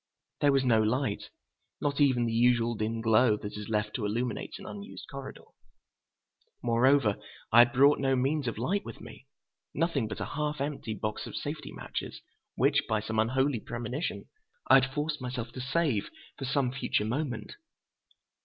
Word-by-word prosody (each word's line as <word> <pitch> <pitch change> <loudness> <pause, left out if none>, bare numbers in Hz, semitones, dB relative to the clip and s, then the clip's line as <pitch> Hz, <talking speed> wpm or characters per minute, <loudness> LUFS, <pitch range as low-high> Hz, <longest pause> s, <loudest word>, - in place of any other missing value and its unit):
There 145 - +4
was 135 -1 +3
no 115 -3 +4
light, 110 0 -1 0.5
not 145 0 -1
even 130 -4 +4
the 115 - -1
usual 120 0 +3
dim 110 +1 -2
glow 115 0 +4
that 105 0 -7
is 105 0 -7
left 105 -1 0
to 115 - -2
illuminate 120 +3 -2
an 200 - -11
unused 205 +1 -8
corridor. 135 -1 -8 1.2
Moreover, 120 -1 +3 0.3
I 115 - +7
had 120 +2 +7
brought 140 +2 +5
no 135 -1 +2
means 135 +2 0
of 115 - -2
light 190 - 0
with - - -9
me—nothing 140 0 -5
but 110 - -6
a - - -2
half 150 0 -2
empty 140 -6 -3
box 105 +1 -4
of - - -8
safety - - -5
matches - - -6 0.4
which, - - +2
by 110 - +2
some 110 +1 -2
unholy 130 +3 +2
premonition, 120 +7 -4 0.4
I - - +8
had 135 +1 -2
forced 150 +1 -2
myself 125 -2 -4
to 130 - -6
save 135 -5 0 0.3
for 135 - -5
some 135 -1 +1
future 130 -5 0
moment. 120 -1 -3
125 Hz, 165 wpm, -29 LUFS, 110-140 Hz, 1.2 s, I